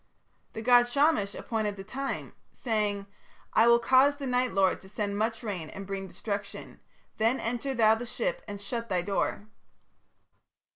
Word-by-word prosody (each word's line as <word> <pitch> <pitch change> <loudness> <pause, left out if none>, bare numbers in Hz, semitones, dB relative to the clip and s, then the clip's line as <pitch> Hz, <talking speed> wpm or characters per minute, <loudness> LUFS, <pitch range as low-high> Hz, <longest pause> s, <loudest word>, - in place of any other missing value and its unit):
"The 220 - -6
god 245 0 +5
Shamash 280 -7 +2
appointed 215 -3 -2
the 195 - -8
time, 270 +7 -4 0.2
saying: 210 -4 -1 0.5
'I 225 - +5
will 235 0 +7
cause 260 +4 +4
the 285 -1 -6
Night 250 -1 +1
Lord 190 -1 +2
to 190 - -14
send 205 0 -3
much 225 +2 -1
rain 185 -8 -4
and 195 - -8
bring 195 0 -4
destruction. 200 +2 -6 0.4
Then 225 +4 +2
enter 245 +3 -2
thou 220 -2 +5
the 235 +2 -4
ship - - -2
and 205 - -6
shut 230 +3 -4
thy 180 -2 0
door.' 200 +2 -1
220 Hz, 160 wpm, -29 LUFS, 200-245 Hz, 0.5 s, will